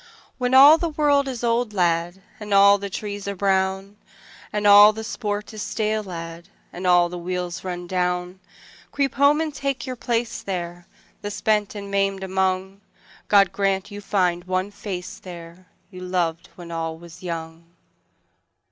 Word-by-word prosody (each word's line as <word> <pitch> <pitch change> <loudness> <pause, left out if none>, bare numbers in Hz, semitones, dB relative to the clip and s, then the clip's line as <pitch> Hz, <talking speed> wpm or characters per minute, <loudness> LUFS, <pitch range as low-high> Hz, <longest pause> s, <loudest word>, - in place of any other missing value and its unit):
When 250 +1 +1
all 290 +4 +9
the 335 - -1
world 290 -2 +2
is 250 -3 -5
old, 235 -1 0
lad, 175 0 0 0.2
And 210 -2 -2
all 200 +1 +6
the 200 0 -5
trees 205 0 -6
are 200 - -3
brown; 195 +1 0 0.5
And 210 0 -2
all 205 +1 +8
the 220 +1 -6
sport 210 -2 -4
is 215 - -6
stale, 215 0 -1
lad, 170 -2 -8 0.2
And 180 +1 -4
all 175 -1 +5
the 175 0 -7
wheels 180 0 -4
run 180 -1 -5
down: 180 0 -2 0.5
Creep 275 -2 0
home 285 +3 +4
and 320 -2 -2
take 275 0 -3
your 255 -1 -5
place 235 -1 -2
there, 175 -2 -5 0.3
The 205 - -4
spent 210 0 0
and 200 -1 -7
maimed 195 -1 0
among: 190 +1 -1 0.5
God 200 -2 +5
grant 195 0 -1
you 205 0 -7
find 180 -4 0
one 185 +2 -2
face 195 -3 -7
there, 175 0 -11 0.2
You 185 -1 -10
loved 175 -2 -2
when 170 -1 -10
all 165 -1 -4
was 170 +1 -14
young. 165 -2 -6
195 Hz, 165 wpm, -23 LUFS, 180-210 Hz, 0.5 s, all